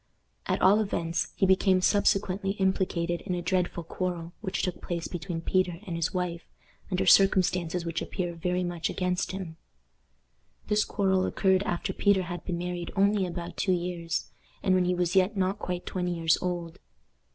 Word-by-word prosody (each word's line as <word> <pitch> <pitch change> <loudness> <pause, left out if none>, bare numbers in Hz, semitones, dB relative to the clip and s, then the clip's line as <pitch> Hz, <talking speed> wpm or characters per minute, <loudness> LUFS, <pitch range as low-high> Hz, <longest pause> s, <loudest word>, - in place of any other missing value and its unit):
At - - 0
all 200 +3 +6
events, 170 -5 -1
he - - +2
became 190 0 +4
subsequently 195 0 +2
implicated 185 -3 0
in 180 - -3
a 175 - -2
dreadful 180 -2 0
quarrel 175 0 -4
which 190 -4 -2
took 180 - -2
place 170 -1 -3
between 175 -1 -4
Peter 180 0 +1
and 175 - -4
his 165 -1 -1
wife, 180 -2 -2 0.5
under 185 -2 0
circumstances 180 -3 +4
which 165 0 -2
appear 175 -2 -3
very 180 +2 -1
much 175 -2 -2
against 180 -1 -1
him. 185 -4 -6 1.1
This 210 0 +3
quarrel 190 -2 +1
occurred 190 -1 +2
after 175 - -2
Peter 200 -2 +3
had 175 -1 -6
been 175 -2 -2
married 175 0 -4
only 200 -1 +3
about 175 0 -6
two 190 - +2
years, 175 -2 -3 0.3
and 190 - +3
when 185 -1 +3
he 180 0 +1
was 175 +1 0
yet 190 +2 +3
not 190 +2 0
quite 180 -3 -4
twenty 180 -1 -2
years 165 -1 +3
old. 175 -2 -3
180 Hz, 170 wpm, -28 LUFS, 175-190 Hz, 1.1 s, all